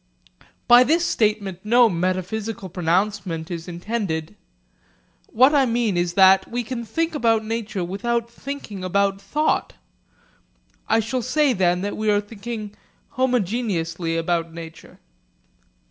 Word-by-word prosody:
By 240 +1 +8
this 330 +6 +2
statement 210 - 0
no 235 +3 +5
metaphysical 185 +3 -2
pronouncement 180 -1 -1
is 170 0 -5
intended. 175 -2 -4 0.9
What 260 +6 +4
I 275 -3 +4
mean 230 -4 0
is 175 0 0
that 190 0 +5
we 245 +1 -2
can 235 +1 -5
think 325 +10 -2
about 225 -6 +1
nature 220 -4 -3
without 230 +6 -2
thinking 235 -5 -7
about 195 +1 0
thought. 300 +10 0 1.2
I 225 - +4
shall 240 +4 -2
say 275 +3 +2
that 180 -2 +1
then 205 - -3
we 215 0 0
are 205 -1 +4
thinking 210 0 -7 0.4
'homogeneously' 195 -9 -1
about 165 0 -1
nature. 165 0 -11
210 Hz, 125 wpm, -22 LUFS, 180-235 Hz, 1.2 s, By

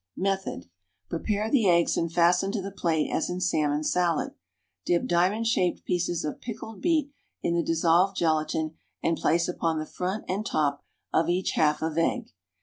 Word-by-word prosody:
Method. 195 - -2 0.4
Prepare 210 +5 -1
the 230 -9 +4
eggs 170 -1 +3
and 165 -1 -1
fasten 175 +3 +3
to 215 - -1
the 195 - -5
plate 165 -5 0
as - - 0
in 180 0 -3
salmon 150 -4 +1
salad. 170 0 +1 0.5
Dip 175 +7 +1
diamond 185 +6 +2
shaped 185 -6 +1
pieces 175 -2 -1
of 150 - -5
pickled 225 -2 -7
beet 310 -4 +1 0.3
in 170 - +1
the 170 - +2
dissolved 170 +4 +2
gelatine 155 -1 0 0.3
and 165 - +2
place 170 +1 +1
upon 165 -2 -1
the 155 - -2
front 185 +6 -4
and 195 +3 -1
top 145 -8 0 0.3
of 165 +1 +2
each 180 +2 +1
half 150 0 +2
of 160 0 -1
egg. 165 - 0
175 Hz, 170 wpm, -27 LUFS, 160-195 Hz, 0.5 s, the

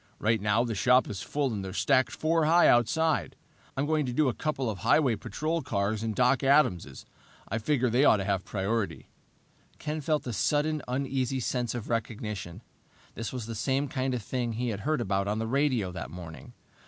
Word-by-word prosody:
Right 110 -1 +1
now 105 +3 +2
the 120 -2 -2
shop 125 +5 +4
is 100 - -5
full 140 -4 -1
and 100 -2 -3
they're 95 -1 -6
stacked 130 +5 +2
four 160 0 +1
high 170 +3 +5
outside. 150 +7 +2 0.4
I'm 135 - +1
going 155 -2 +1
to - - -2
do 140 +2 +2
a - - -1
couple 135 +2 -2
of 105 -4 -3
highway 130 - +3
patrol 160 +10 -3
cars 100 -1 -1
and 110 -1 -2
Doc 125 +1 +3
Adams'. 100 - +2 0.4
I 110 - -1
figured 125 0 +1
they 125 +4 +3
ought 110 - +6
to 100 - -2
have 95 -1 -1
priority." 105 +2 -2 0.7
Ken 155 0 -4
felt 150 +1 0
a 120 - -3
sudden, 150 +7 +1
uneasy 130 0 -1
sense 125 -1 -2
of 115 -3 -5
recognition. 105 -4 -4 0.5
This 115 -1 -5
was 125 -4 -5
the 115 - -5
same 135 +6 0
kind 130 -1 -1
of 120 - -4
thing 120 0 -2
he 120 +2 -2
had 105 -2 -3
heard 150 +3 0
about 100 -2 0
on 105 +1 -1
the 110 - -2
radio 125 -6 +1
that 90 - -6
morning! 80 -1 -10
120 Hz, 200 wpm, -28 LUFS, 105-140 Hz, 0.7 s, ought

